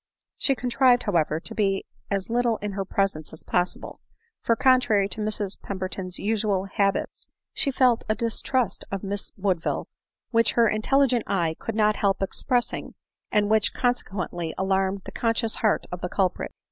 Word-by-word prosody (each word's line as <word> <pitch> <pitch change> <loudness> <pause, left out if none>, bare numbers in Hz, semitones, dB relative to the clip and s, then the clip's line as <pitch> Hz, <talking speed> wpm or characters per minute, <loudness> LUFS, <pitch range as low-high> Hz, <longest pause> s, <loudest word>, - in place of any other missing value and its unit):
She 275 - +3
contrived, 250 0 +3
however, 160 -5 +1
to 225 - -6
be 195 -3 0 0.2
as 195 -2 -1
little 240 -1 +2
in 210 0 -4
her 195 0 -2
presence 190 -6 -1
as 160 - -7
possible; 180 0 -2 0.4
for, 230 - +2
contrary 245 -6 +3
to 215 - -5
Mrs 210 -2 -2
Pemberton's 185 -1 -4
usual 205 -2 0
bab 195 -1 +3
its, - - -5 0.3
she 285 - +1
felt 255 -3 +3
a 215 - +2
distrust 235 +1 0
of 195 0 -3
Miss 200 +1 -3
Woodville, 185 -4 -1 0.4
which 230 -2 +3
her 235 -1 +4
intel 270 +7 +3
ligent 245 -2 +1
eye 170 -4 0
could 225 - -4
not 215 -1 +3
help 195 -1 +1
expressing, 245 +5 -1 0.4
and 210 -1 +3
which 220 -1 +3
conse 245 0 +1
quently 175 -4 -4
alarmed 190 0 0
the - - -7
conscious 230 -1 0
heart 215 -2 +1
of 180 0 -5
the 180 - -3
culprit. 185 -1 -1
205 Hz, 170 wpm, -25 LUFS, 190-230 Hz, 0.4 s, her